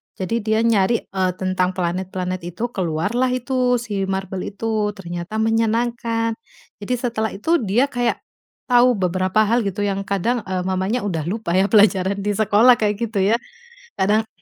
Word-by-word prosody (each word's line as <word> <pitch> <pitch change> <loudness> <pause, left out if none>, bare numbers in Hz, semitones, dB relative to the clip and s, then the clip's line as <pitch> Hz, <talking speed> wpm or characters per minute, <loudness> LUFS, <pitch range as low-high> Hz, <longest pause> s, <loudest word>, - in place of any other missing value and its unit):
Jadi 195 +5 -2
dia 220 0 0
nyari, 230 0 +2
eee, 190 -1 -1
tentang 185 0 -1
planet-planet 185 +1 -2
itu, 225 +8 -4
keluarlah 195 +7 0
itu 255 0 +1
si 210 -5 -2
MarBel 190 0 -4
itu, 215 -1 -1
ternyata 175 +1 -6
menyenangkan. 230 +1 0 0.5
Jadi 205 +4 -3
setelah 230 -4 -2
itu 330 +12 +1
dia 240 +6 +1
kayak, 245 -2 -1 0.5
tahu 245 0 +5
beberapa 185 +2 +1
hal 230 +3 +2
gitu 200 +1 -2
yang 195 -1 -2
kadang, 215 +5 0
eee, 185 -1 -2
mamanya 190 +6 -1
udah 165 -6 -2
lupa 210 -1 -3
ya 190 +3 +3
pelajaran 200 -3 +4
di 205 - 0
sekolah 215 +4 +4
kayak 210 -1 +1
gitu 225 -1 -2
ya. 200 +4 +3 0.6
Kadang, 215 +3 +1
205 Hz, 155 wpm, -21 LUFS, 190-230 Hz, 0.6 s, tahu